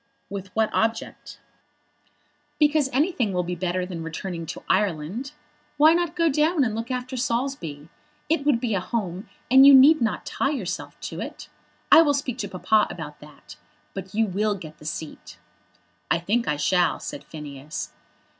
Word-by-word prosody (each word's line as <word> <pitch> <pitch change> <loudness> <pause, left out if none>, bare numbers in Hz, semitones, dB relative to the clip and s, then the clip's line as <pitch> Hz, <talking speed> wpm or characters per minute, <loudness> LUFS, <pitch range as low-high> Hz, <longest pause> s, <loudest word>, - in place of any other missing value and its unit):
"With 195 -1 -5
what 220 -1 +2
object?" 225 0 -2 1.2
"Because 300 -2 +3
anything 265 - +1
will 180 0 0
be 175 +1 -4
better 180 0 -2
than 180 -3 -6
returning 165 +1 -5
to 170 - -7
Ireland. 190 - -1 0.4
Why 310 +2 +7
not 345 -1 0
go 335 -1 +2
down 305 +1 +2
and 225 -4 -1
look 225 +2 -4
after 255 +1 -4
Saulsby? 235 - -3 0.4
It 315 -2 +1
would 285 -5 +3
be 235 -2 -1
a 195 - +1
home, 185 -1 -4 0.2
and 265 +1 +8
you 280 0 +10
need 280 +3 +7
not 225 -2 -1
tie 275 - -1
yourself 245 - -4
to - - -6
it. - - -8 0.4
I - - +10
will 290 -3 +3
speak 260 -3 -3
to 200 -4 -3
Papa 210 +3 +2
about - - -8
that. - - -14 0.4
But 190 0 -7
you 225 +1 +3
will 205 +2 0
get 155 -5 -11
the - - -14
seat." 155 0 -7 0.7
"I - - +3
think 215 +8 -1
I 150 - 0
shall," 175 +5 +2
said - - -7
Phineas. 150 -2 -7
220 Hz, 170 wpm, -24 LUFS, 180-270 Hz, 1.2 s, you